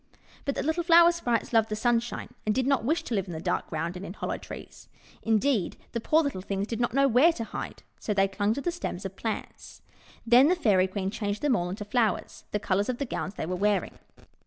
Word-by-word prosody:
But 280 - -1
the - - -2
little 320 +3 0
Flower 340 0 +7
Sprites 245 -10 -1
loved 225 -1 +4
the 215 - -1
sun 235 +2 +2
shine, 235 +1 -7
and 215 - 0
did 260 0 +1
not 275 -4 +2
wish 315 +8 0
to - - -5
live 195 -3 0
in 175 - -6
the 160 - -5
dark - - -1
ground 165 +2 -3
and 180 - -7
in 185 - -6
hollow - - -3
trees. - - -11 0.3
Indeed, 225 -2 +1
the 235 - -3
poor 315 +7 +3
little 275 -10 -3
things 195 +1 -2
did 225 +1 -4
not 240 0 0
know 275 0 +5
where 270 +7 +5
to 235 - -4
hide; - - -7 0.2
so - - -3
they 195 -1 +3
clung 205 +3 0
to 280 - -3
the 350 - -1
stems 210 - -5
of 190 0 -5
plants. 220 +1 -6 0.4
Then 245 +4 +7
the 360 - +4
Fairy 200 - +3
Queen 190 0 -3
changed 205 +1 -3
them 285 -4 +3
all 175 -2 -1
into 205 +3 -5
flowers, 225 0 -1
the - - -1
colours 200 +1 0
of 250 - -1
the 280 - -2
gowns 205 -4 -4
they - - -3
were 180 +3 -2
wearing. 200 0 0
225 Hz, 245 wpm, -27 LUFS, 195-270 Hz, 0.4 s, Flower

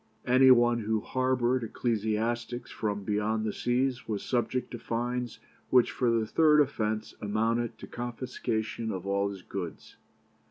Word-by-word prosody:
Any 130 +2 +6
one 120 -1 +5
who 110 0 0
harboured 130 0 +1
ecclesiastics 115 +2 -2
from 105 -2 -2
beyond 105 +2 0
the 105 - -1
seas 125 +1 0
was 105 -3 -3
subject 125 0 -1
to 120 - -6
fines 120 +1 -3 0.3
which 125 -2 +4
for 125 - +1
the 115 -1 +2
third 150 +6 +4
offence 110 -6 0
amounted 115 +2 0
to - - -9
confiscation 115 -2 -3
of 95 -1 -5
all 100 0 +1
his 95 -2 -8
goods. - - -7
115 Hz, 145 wpm, -29 LUFS, 110-125 Hz, 0.3 s, Any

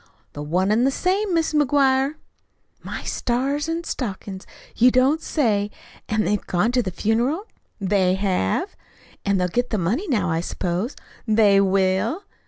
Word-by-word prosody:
"The 145 - -6
one 180 +7 0
and 225 +3 +3
the 270 - +4
same, 380 +8 0
Mis' 325 -1 +1
McGuire." 280 -1 +3 0.7
"My - - -6
stars 275 +6 -1
an' 330 +1 -2
stockin's, 195 - -5 0.3
you 245 +2 +6
don't 260 +6 +3
say! 210 -9 0 0.4
An' 215 0 +1
they've 210 -1 -1
gone 195 +6 +1
to 250 0 +2
the 200 - -3
funeral?" 240 - 0 0.3
"They 190 -2 +2
have." 185 - -1 0.5
"An' 200 -1 +2
they'll 180 -1 +1
get 245 +7 -1
the 215 - -1
money 220 - -1
now, 205 - 0
I 165 - 0
s'pose." 180 - -3 0.3
"They 210 -2 +5
will." 195 - +1
220 Hz, 155 wpm, -22 LUFS, 190-270 Hz, 0.7 s, you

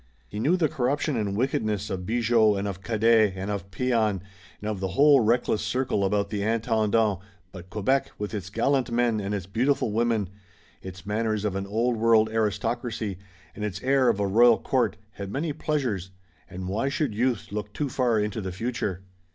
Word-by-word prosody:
He 105 - -6
knew 160 +11 +2
the 165 -3 +2
corruption 140 0 -1
and 100 -3 -1
wickedness 110 -5 -1
of 90 -1 -4
Bigot 115 -2 +3
and 100 +1 -2
of 95 -1 -5
Cadet 110 -1 +3
and 95 +2 -4
of 100 -2 -4
Pean 125 +7 -1
and 105 -5 +1 0.4
of 105 -2 -2
the 95 - -1
whole 145 -1 +7
reckless 115 -1 +2
circle 110 -1 0
about 100 +1 0
the 105 -2 -2
Intendant, 110 -2 +1 0.3
but 90 -1 -11
Quebec, 130 +8 0
with 105 0 -5
its 100 -3 -4
gallant 130 +5 +1
men 120 -2 +1
and 100 +1 -2
its 95 -4 -4
beautiful 120 +4 0
women; 110 -3 0 0.5
its 90 -2 -9
manners 110 0 -1
of 100 -2 -1
an 95 0 -3
Old 115 +4 0
World 110 -1 +4
aristocracy 110 -1 -2 0.4
and 105 - -6
its 100 -2 -3
air 130 -1 +3
of 110 -3 +1
a 100 - +1
royal 115 +4 +5
court, 130 -2 0
had 100 -1 -7
many 150 +4 -2
pleasures, 125 - -2 0.4
and 90 0 -6
why 110 +8 -1
should 145 -4 -1
youth 120 +1 -1
look 105 0 -4
too 145 +7 -2
far 125 -4 +1
into 105 +1 -2
the 95 -1 -4
future? 100 -2 -3
110 Hz, 185 wpm, -26 LUFS, 100-120 Hz, 0.5 s, whole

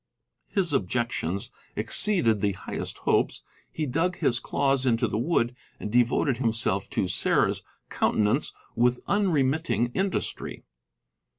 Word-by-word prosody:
His 180 -6 0
objections 100 - -1 0.2
exceeded 120 - +2
the 100 -1 +1
highest - - -5
hopes; - - +1 0.3
he 155 - -2
dug 165 +7 0
his 120 -1 +2
claws 135 -2 +1
into 120 -3 +2
the 110 - -2
wood 120 -3 +1 0.2
and 105 - -5
devoted 120 +2 +2
himself 110 -5 0
to 95 - 0
Sarah's 90 - +2 0.3
countenance 105 -1 +1 0.2
with 120 +1 +2
unremitting 155 - +1
industry. 190 0 -2
125 Hz, 115 wpm, -26 LUFS, 115-155 Hz, 0.3 s, exceeded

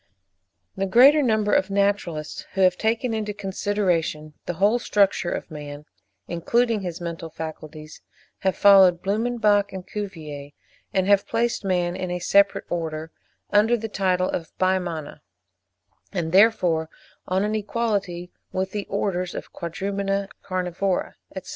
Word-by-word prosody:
The 195 0 -1
greater 270 +9 +7
number 215 -5 +1
of 190 - +2
naturalists 200 -6 -1
who 195 - -1
have 185 -1 +5
taken 225 +4 0
into 210 -2 -3
consideration 190 -6 -1
the 175 - -2
whole 205 +7 +3
structure 200 -6 +2
of - - -5
man, 145 -1 -8 0.4
including 225 +6 +1
his 175 -2 -5
mental 170 -1 -5
faculties, 155 -1 -8 0.4
have 190 -1 0
followed 190 -3 +6
Blumenbach 210 -1 +1
and 190 -1 -7
Cuvier, 155 -9 -7 0.4
and 190 -1 +1
have 200 0 +3
placed 230 0 0
man 180 -2 0
in 185 - -4
a 180 - -2
separate 200 +3 +3
Order, 160 -2 -4 0.4
under 215 +4 +4
the 225 0 -4
title 185 -2 +1
of 165 - -3
the - - -33
Bimana, 180 -5 -1 0.9
and 170 -4 -2
therefore 180 -6 +4 0.4
on 190 +2 +1
an 210 +1 -1
equality 205 -5 -2 0.2
with 190 +1 -2
the 205 -1 -4
orders 185 -3 -2
of - - -4
the - - -23
Quadrumana, 195 +3 -3
Carnivora, 185 0 -2 0.2
etc. 185 -1 -7
190 Hz, 140 wpm, -24 LUFS, 175-205 Hz, 0.9 s, greater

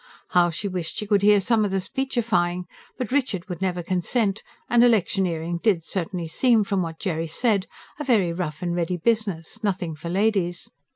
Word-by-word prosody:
How 175 -1 +4
she 175 +5 -4
wished 180 -4 -4
she 210 - -3
could 205 -1 +2
hear 205 0 +6
some 220 +2 +2
of 205 - 0
the 195 0 0
speechifying! 215 -6 -1 0.3
But 250 -2 -4
Richard 255 -10 0
would 180 -1 -6
never 180 -2 -1
consent; 195 +4 0 0.3
and 240 0 +5
electioneering 180 -7 +1
did 195 -8 +2
certainly 175 -1 -3
seem, 230 +6 +3
from 195 -1 0
what 165 -2 -4
Jerry 165 -4 -2
said, 200 +3 +1 0.3
a - - -2
very 210 -11 +2
rough 170 -2 -4
and 175 -1 -1
ready 175 +1 -1
business 215 0 -1
nothing 180 -5 -1
for 155 +3 -7
ladies. 195 0 0
190 Hz, 180 wpm, -24 LUFS, 175-215 Hz, 0.3 s, hear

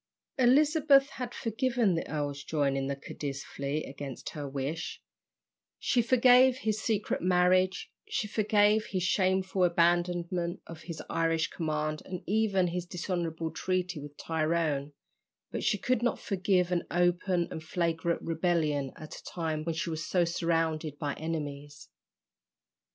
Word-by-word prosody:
Elizabeth 280 +2 +5
had 250 -1 -5
forgiven 235 -3 0
the 165 - -3
earl's 145 -2 -3
joining 140 -3 0
the 140 - -1
Cadiz 140 0 -6
fleet 140 +2 -3
against 135 -2 -7
her 145 -2 -5
wish, 140 +5 -4 0.8
she 245 - +2
forgave 250 +2 +5
his 215 -3 -1
secret 215 -2 -1
marriage, 185 +1 +2 0.2
she 210 - -1
forgave 210 0 +3
his 185 -2 -2
shameful 190 0 +1
abandonment 175 0 +1
of 165 -1 -10
his 165 -3 -7
Irish 165 -1 +1
command 155 -2 -2
and 180 -2 -6
even 205 -3 +2
his 175 0 -4
dishonourable 170 -3 -3
treaty 180 -2 -2
with 145 0 -10
Tyrone, 155 -3 -1 0.6
but - - -3
she - - +2
could 255 -3 0
not 240 - +1
forgive 185 -2 +1
an 175 -1 +1
open 175 0 +1
and 160 - -6
flagrant 170 0 -1
rebellion 160 -5 0
at 155 - -9
a - - -12
time 160 -3 -3
when 165 -1 -1
she 165 +1 -2
was 160 0 -3
so 175 +2 +2
surrounded 165 -3 -1
by 145 -2 -2
enemies. 145 -3 -5
170 Hz, 140 wpm, -30 LUFS, 155-190 Hz, 0.8 s, Elizabeth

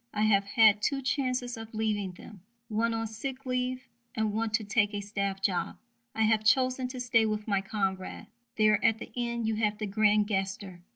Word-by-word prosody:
I 210 - +1
have 200 -2 +3
had 215 -2 +5
two 275 +2 0
chances 255 -2 -1
of 225 0 -9
leaving 210 -4 -1
them 195 +1 -13 0.3
one 230 +2 +1
on 225 0 -2
sick 255 +5 -6
leave 255 0 -2 0.3
and 220 -2 0
one 225 +1 0
to 215 +1 +1
take 210 0 +1
a - - -1
staff 200 -1 -3
job. 185 -3 -1 0.4
I 220 - +2
have 215 0 +3
chosen 255 +2 +2
to 255 0 -7
stay 235 -3 +3
with 215 0 -3
my 200 -2 +1
comrades. 195 -2 -3 0.3
There 215 -1 +3
at 225 - +4
the - - -9
end 235 -1 -2
you 220 -1 0
have 210 -1 0
the 215 - -3
grand 210 0 +3
gesture. 195 -2 -3
215 Hz, 195 wpm, -29 LUFS, 205-235 Hz, 0.4 s, had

